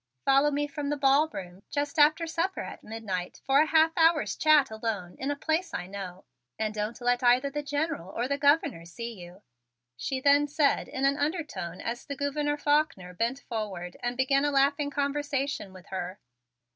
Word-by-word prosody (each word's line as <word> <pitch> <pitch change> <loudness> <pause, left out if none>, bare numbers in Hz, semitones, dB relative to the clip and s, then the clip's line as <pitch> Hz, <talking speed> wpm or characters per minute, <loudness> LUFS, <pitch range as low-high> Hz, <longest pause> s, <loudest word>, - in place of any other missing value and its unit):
"Follow 275 +2 +5
me 290 0 0
from 290 0 -4
the 295 - -1
ballroom 270 - +1
just 290 +1 -2
after 310 +3 +5
supper 335 +3 -2
at - - -8
midnight 205 -5 -5
for 270 +1 +4
a 310 - +2
half 320 +1 +4
hour's 325 -2 +3
chat 300 -5 +4
alone 215 -5 -4
in 270 - -2
a 290 - 0
place 320 +5 -1
I 175 - -3
know; 190 -1 -8 0.3
and 215 -1 -1
don't 215 +3 -3
let 245 +1 +2
either 250 +3 +4
the 295 +1 -2
General 290 - -2
or 235 +5 -2
the 280 +1 -1
Governor 285 - +3
see 230 +8 -7
you," 180 0 -12 0.5
she 260 - -3
then 285 +2 +4
said 290 0 +1
in 265 - -2
an 275 +1 +3
undertone 290 - -3
as 235 +1 -4
the 280 - -6
Gouverneur 290 +1 -1
Faulkner 290 - +1
bent 235 +8 -1
forward 195 -8 -5
and 245 0 -2
began 275 +1 +3
a 290 - +2
laughing 285 +1 +2
conversation 280 -5 -2
with 185 -1 -13
her. 185 0 -5
275 Hz, 185 wpm, -28 LUFS, 215-290 Hz, 0.5 s, Follow